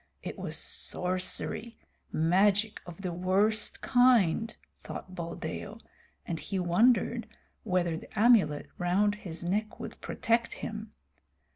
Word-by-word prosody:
It -, -, -5 dB
was -, -, -3 dB
sorcery, 185 Hz, +5 st, -1 dB, 0.3 s
magic 195 Hz, +6 st, +2 dB
of 175 Hz, +2 st, -9 dB
the 180 Hz, -2 st, -2 dB
worst 200 Hz, +5 st, +1 dB
kind, 230 Hz, -5 st, +3 dB, 0.2 s
thought 185 Hz, -, -8 dB
Buldeo, 165 Hz, -, -5 dB, 0.5 s
and 165 Hz, -2 st, -3 dB
he 195 Hz, -, -4 dB
wondered 225 Hz, +6 st, +3 dB, 0.4 s
whether 180 Hz, -5 st, +1 dB
the 160 Hz, -, -7 dB
amulet 210 Hz, -11 st, +5 dB
round 190 Hz, +4 st, +2 dB
his 185 Hz, -6 st, -7 dB
neck 210 Hz, +5 st, -1 dB
would -, -, -8 dB
protect 230 Hz, +1 st, 0 dB
him. 215 Hz, 0 st, -6 dB
195 Hz, 115 wpm, -30 LUFS, 175-220 Hz, 0.5 s, amulet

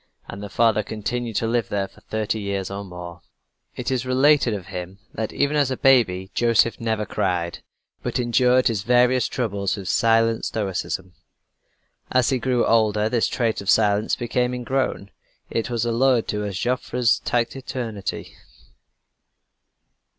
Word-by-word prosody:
And 100 Hz, -, -8 dB
the 105 Hz, -, -6 dB
father 110 Hz, -1 st, +3 dB
continued 110 Hz, +2 st, -4 dB
to 115 Hz, -, +1 dB
live 115 Hz, -3 st, 0 dB
there 100 Hz, -1 st, -1 dB
for -, -, -21 dB
thirty 110 Hz, 0 st, -2 dB
years 100 Hz, -2 st, -3 dB
or 100 Hz, +1 st, -5 dB
more. 90 Hz, -2 st, -9 dB, 0.5 s
It -, -, -3 dB
is 130 Hz, -1 st, 0 dB
related 130 Hz, 0 st, +3 dB
of 95 Hz, -3 st, -7 dB
him 95 Hz, 0 st, -7 dB, 0.2 s
that 110 Hz, 0 st, -3 dB
even 140 Hz, +1 st, 0 dB
as 145 Hz, -3 st, +2 dB
a 130 Hz, -, -2 dB
baby 100 Hz, -9 st, +3 dB
Joseph 115 Hz, -1 st, +2 dB
never 110 Hz, -2 st, -1 dB
cried, 90 Hz, -3 st, -2 dB, 0.4 s
but -, -, -2 dB
endured 125 Hz, +1 st, +3 dB
his 110 Hz, -4 st, 0 dB
various 125 Hz, +2 st, +3 dB
troubles 100 Hz, -5 st, -2 dB
with 95 Hz, -2 st, -7 dB
silent 115 Hz, +2 st, +2 dB
stoicism. 95 Hz, -3 st, -3 dB, 1.0 s
As 130 Hz, 0 st, +3 dB
he 130 Hz, -, +1 dB
grew 125 Hz, 0 st, +1 dB
older, 110 Hz, -1 st, +2 dB
this 115 Hz, -1 st, +1 dB
trait 115 Hz, -4 st, -1 dB
of 100 Hz, -, -5 dB
silence 105 Hz, -1 st, +3 dB
became 125 Hz, +1 st, -1 dB
ingrown; 125 Hz, -5 st, -2 dB, 0.4 s
it 115 Hz, -, -1 dB
was 120 Hz, -1 st, -1 dB
alluded 120 Hz, 0 st, +2 dB
to 105 Hz, 0 st, -2 dB
as 100 Hz, -2 st, -4 dB
"Joffre's 125 Hz, +1 st, +1 dB
taciturnity." 120 Hz, -3 st, -3 dB
115 Hz, 150 wpm, -23 LUFS, 100-125 Hz, 1.0 s, father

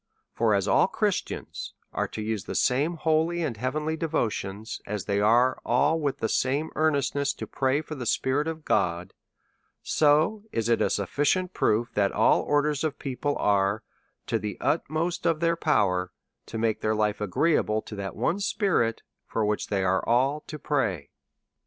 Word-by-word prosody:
For 110 Hz, -3 st, +2 dB
as 100 Hz, -, 0 dB
all -, -, +4 dB
Christians -, -, -3 dB, 0.2 s
are -, -, -1 dB
to 110 Hz, -, -6 dB
use 110 Hz, -2 st, -3 dB
the -, -, -5 dB
same 145 Hz, +7 st, +2 dB
holy 160 Hz, +2 st, +1 dB
and 135 Hz, -7 st, -2 dB
heavenly 150 Hz, +7 st, -2 dB
de 165 Hz, +1 st, -2 dB
votion, 110 Hz, -7 st, -2 dB, 0.2 s
as 105 Hz, -2 st, -3 dB
they 100 Hz, -1 st, 0 dB
are 120 Hz, +5 st, +4 dB
all, 145 Hz, +7 st, +2 dB
with 145 Hz, -3 st, -1 dB
the 110 Hz, -, -1 dB
same 140 Hz, +7 st, 0 dB
earnestness, 145 Hz, -2 st, +1 dB
to -, -, -6 dB
pray 135 Hz, +2 st, 0 dB
for 155 Hz, -, -8 dB
the 130 Hz, -5 st, -5 dB
Spirit 140 Hz, +4 st, +1 dB
of 160 Hz, -1 st, -5 dB
God, 85 Hz, +1 st, 0 dB, 0.7 s
so 155 Hz, +8 st, +3 dB
it 115 Hz, -1 st, -1 dB
is 115 Hz, -1 st, +3 dB
a -, -, +2 dB
sufficient 145 Hz, -, 0 dB
proof 115 Hz, +2 st, +1 dB
that 100 Hz, -1 st, +2 dB
ail -, -, +4 dB
orders 145 Hz, 0 st, +1 dB
of 155 Hz, -3 st, -1 dB
people 140 Hz, +2 st, -2 dB
are, 100 Hz, +1 st, +1 dB, 0.4 s
to -, -, 0 dB
the 105 Hz, -1 st, -5 dB
utmost 165 Hz, +2 st, -1 dB
of 165 Hz, -2 st, +2 dB
their 170 Hz, 0 st, +2 dB
power, 95 Hz, -, +1 dB, 0.4 s
to 115 Hz, -, -5 dB
make 110 Hz, -1 st, 0 dB
their 110 Hz, 0 st, +1 dB
life 105 Hz, -1 st, 0 dB
agreeable 110 Hz, -, +1 dB
to 105 Hz, -, -8 dB
that 100 Hz, -1 st, -5 dB
one 185 Hz, -, 0 dB
spirit, 190 Hz, -, 0 dB, 0.2 s
for 110 Hz, -, -1 dB
which 105 Hz, 0 st, -1 dB
they 100 Hz, -2 st, 0 dB
are 95 Hz, 0 st, +1 dB
all 135 Hz, +5 st, +3 dB
to 155 Hz, -, -6 dB
pray. 100 Hz, -, -1 dB
130 Hz, 175 wpm, -26 LUFS, 105-155 Hz, 0.7 s, all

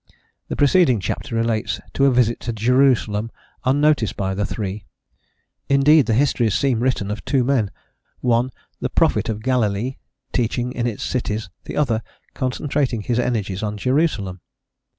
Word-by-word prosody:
the -, -, -3 dB
preceding 145 Hz, -, +4 dB
chapter 95 Hz, +5 st, -4 dB
relates 115 Hz, 0 st, 0 dB
to 140 Hz, -, +3 dB
a -, -, +4 dB
visit 120 Hz, -2 st, +2 dB
to 120 Hz, -, -3 dB
Jerusalem 115 Hz, -2 st, +2 dB, 0.4 s
unnoticed 145 Hz, -3 st, +2 dB
by 95 Hz, -1 st, -1 dB
the 100 Hz, +1 st, -1 dB
three: 100 Hz, -2 st, -5 dB, 0.8 s
indeed, 140 Hz, 0 st, +5 dB
the 115 Hz, -, +2 dB
histories 120 Hz, -5 st, +2 dB
seem 130 Hz, -5 st, +1 dB
written 120 Hz, -5 st, 0 dB
of 105 Hz, 0 st, -5 dB
two 135 Hz, -3 st, +1 dB
men, 120 Hz, -5 st, +1 dB, 0.5 s
one 120 Hz, 0 st, +2 dB, 0.3 s
the -, -, -2 dB
"prophet -, -, +2 dB
of 110 Hz, -1 st, -3 dB
Galilee" 125 Hz, -1 st, 0 dB, 0.4 s
teaching 120 Hz, +1 st, 0 dB
in 120 Hz, -1 st, -1 dB
its 110 Hz, -4 st, -4 dB
cities, 110 Hz, -6 st, -2 dB
the -, -, -6 dB
other 115 Hz, -7 st, +1 dB, 0.3 s
concentrating 130 Hz, -2 st, -1 dB
his 120 Hz, +3 st, -1 dB
energies 105 Hz, -6 st, -1 dB
on 105 Hz, -1 st, -3 dB
Jerusalem. 110 Hz, -, 0 dB
120 Hz, 150 wpm, -21 LUFS, 105-130 Hz, 0.8 s, indeed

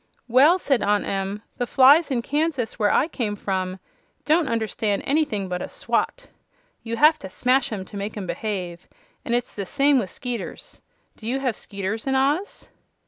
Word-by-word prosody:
"Well," 275 Hz, +9 st, +6 dB
said 275 Hz, -, +1 dB
Aunt 205 Hz, 0 st, +1 dB
Em, 195 Hz, +2 st, -3 dB, 0.2 s
"the 245 Hz, -, -1 dB
flies 285 Hz, +7 st, +6 dB
in 245 Hz, -4 st, -1 dB
Kansas, 290 Hz, -5 st, -1 dB
where 205 Hz, -1 st, +3 dB
I 295 Hz, -, +3 dB
came 230 Hz, -10 st, -3 dB
from, 185 Hz, -2 st, -2 dB, 0.5 s
don't 310 Hz, -1 st, +3 dB
understand 220 Hz, -2 st, -1 dB
anything 275 Hz, -10 st, 0 dB
but 180 Hz, -1 st, -3 dB
a -, -, -5 dB
swat. -, -, -2 dB, 0.6 s
You 230 Hz, 0 st, -4 dB
have 305 Hz, +4 st, +5 dB
to 190 Hz, -, -8 dB
smash 250 Hz, +7 st, +1 dB
'em 195 Hz, -4 st, -4 dB
to 200 Hz, -, -9 dB
make 205 Hz, +2 st, -5 dB
'em 200 Hz, -, -4 dB
behave; 180 Hz, -3 st, -4 dB, 0.4 s
and 235 Hz, -, 0 dB
it's 245 Hz, 0 st, -2 dB
the 200 Hz, -, -4 dB
same 280 Hz, +7 st, +3 dB
way 240 Hz, -, +1 dB
with -, -, -14 dB
'skeeters. 245 Hz, -5 st, -6 dB, 0.4 s
Do 220 Hz, -, -9 dB
you 260 Hz, +3 st, 0 dB
have 250 Hz, -5 st, 0 dB
'skeeters 200 Hz, +4 st, -5 dB
in 270 Hz, -, +1 dB
Oz?" 290 Hz, +9 st, 0 dB
230 Hz, 185 wpm, -23 LUFS, 200-275 Hz, 0.6 s, Well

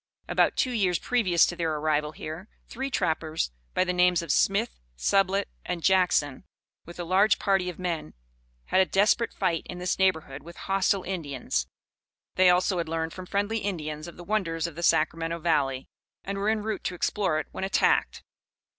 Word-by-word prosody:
About -, -, +2 dB
two 255 Hz, -, +1 dB
years 190 Hz, -7 st, +1 dB
previous 190 Hz, -9 st, +3 dB
to 175 Hz, -, -3 dB
their 165 Hz, -3 st, -1 dB
arrival 150 Hz, 0 st, 0 dB
here, 160 Hz, +7 st, -7 dB, 0.2 s
three 265 Hz, +3 st, -4 dB
trappers 160 Hz, -, -1 dB, 0.2 s
by -, -, +3 dB
the 180 Hz, 0 st, -1 dB
names 180 Hz, -1 st, +3 dB
of 170 Hz, -, -2 dB
Smith, -, -, +1 dB, 0.2 s
Sublett, 195 Hz, -, +2 dB, 0.2 s
and 175 Hz, -2 st, -4 dB
Jackson, 180 Hz, -7 st, +2 dB, 0.4 s
with 170 Hz, +1 st, -11 dB
a -, -, -2 dB
large 190 Hz, +5 st, +3 dB
party 195 Hz, -3 st, +1 dB
of 180 Hz, -, -8 dB
men, 170 Hz, -, -4 dB, 0.5 s
had 190 Hz, -, +3 dB
a -, -, +4 dB
desperate 210 Hz, +4 st, +2 dB
fight 175 Hz, -4 st, 0 dB
in 180 Hz, -, -6 dB
this 180 Hz, +1 st, -2 dB
neighborhood 160 Hz, -7 st, +1 dB
with 170 Hz, +3 st, -12 dB
hostile 195 Hz, 0 st, +1 dB
Indians. 140 Hz, -, -3 dB, 0.7 s
They, 185 Hz, 0 st, +5 dB
also, 180 Hz, +1 st, +2 dB
had 165 Hz, -2 st, -3 dB
learned 160 Hz, 0 st, -2 dB
from 185 Hz, -1 st, -9 dB
friendly 205 Hz, +3 st, -1 dB
Indians 155 Hz, -6 st, -4 dB
of 170 Hz, -, -11 dB
the 175 Hz, -, -9 dB
wonders 170 Hz, -5 st, -1 dB
of 170 Hz, -, -4 dB
the 170 Hz, -, -7 dB
Sacramento 165 Hz, 0 st, +1 dB
Valley, 145 Hz, -6 st, 0 dB, 0.4 s
and 195 Hz, 0 st, -4 dB
were 205 Hz, +2 st, +1 dB
en 220 Hz, -1 st, 0 dB
route 215 Hz, -2 st, -3 dB
to 180 Hz, -, -2 dB
explore 180 Hz, -2 st, 0 dB
it -, -, -4 dB
when -, -, -5 dB
attacked. 190 Hz, -, +1 dB
180 Hz, 180 wpm, -27 LUFS, 160-195 Hz, 0.7 s, They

